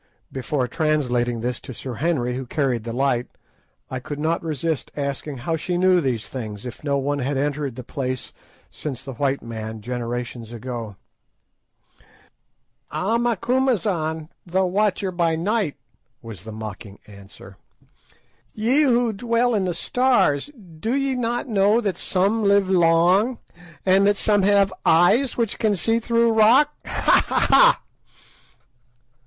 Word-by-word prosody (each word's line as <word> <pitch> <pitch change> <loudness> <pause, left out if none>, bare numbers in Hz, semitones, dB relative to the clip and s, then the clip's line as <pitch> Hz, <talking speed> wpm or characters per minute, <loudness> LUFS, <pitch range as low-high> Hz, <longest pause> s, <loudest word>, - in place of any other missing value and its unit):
Before 130 0 -2
translating 125 -5 0
this 125 0 -2
to 130 - -10
Sir 130 +2 -6
Henry, 130 -7 0
who 130 0 -5
carried 125 -5 -1
the 115 - -4
light, 125 -1 0 0.6
I 130 - -3
could 145 +3 -6
not 160 +3 0
resist 160 -1 -3
asking 140 0 -4
how 165 +7 -2
she 175 +3 -2
knew 185 0 +4
these 125 -6 -2
things, 110 -4 -7
if 125 +3 -8
no 140 -2 0
one 140 +1 -1
had 140 +1 -1
entered 145 -2 -2
the 125 - -7
place 130 -1 -4 0.4
since 135 -4 -6
the 135 -1 -7
white 140 +2 -1
man, 110 -1 -6
generations 120 0 -5
ago. 120 -3 -6 1.9
"Ah, 225 +5 0
Macumazahn, 215 - 0
the 185 +2 0
watcher 195 0 0
by 170 -2 +1
night," 195 -1 -1 0.5
was 110 -5 -9
the 110 - -7
mocking 105 -2 -8
answer, 100 -1 -14 1.0
"ye 240 +7 +2
who 245 -5 +2
dwell 235 +3 +1
in 200 -3 +1
the 180 -2 -2
stars, 245 - +1 0.3
do 225 +8 -1
ye 275 -1 0
not 240 0 -2
know 210 0 +3
that 200 -6 -1
some 200 +4 +1
live 200 -1 +4
long, 180 +6 +3 0.5
and 195 +1 +4
that 205 0 +3
some 205 0 +2
have 200 -1 +3
eyes 205 +11 +4
which 230 -3 -1
can 215 -2 +2
see 225 +5 +1
through 230 0 +2
rock? 245 +7 +5
_Ha! - - +3
ha! - - 0
ha! - - +6
160 Hz, 145 wpm, -22 LUFS, 125-210 Hz, 1.9 s, ha